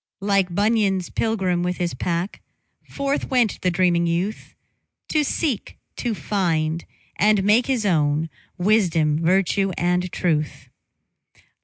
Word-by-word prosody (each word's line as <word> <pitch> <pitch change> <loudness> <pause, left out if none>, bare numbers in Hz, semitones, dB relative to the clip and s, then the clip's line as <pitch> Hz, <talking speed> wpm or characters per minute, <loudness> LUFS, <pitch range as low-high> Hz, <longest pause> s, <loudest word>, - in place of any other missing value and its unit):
] - - -70
LIKE 195 -2 +3
Bunyan's 205 -3 +1
pilgrim 190 -6 0
with 180 0 -1
his 175 -1 -2
pack, 170 +8 -3 0.5
Forth 280 0 -2
went 245 -6 +1
the 180 - +2
dreaming 175 -1 +2
youth 180 +6 -3 0.5
To 305 -1 +2
seek, 285 - -2 0.2
to 235 -3 -2
find, 165 -6 -1 0.3
and 210 +1 +3
make 215 +5 +3
his 250 -5 0
own 155 -3 +1 0.3
Wisdom, 170 -6 +2
virtue, 195 +2 +2
and 180 +1 0
truth. 155 -4 -2
185 Hz, 125 wpm, -22 LUFS, 170-215 Hz, 0.5 s, LIKE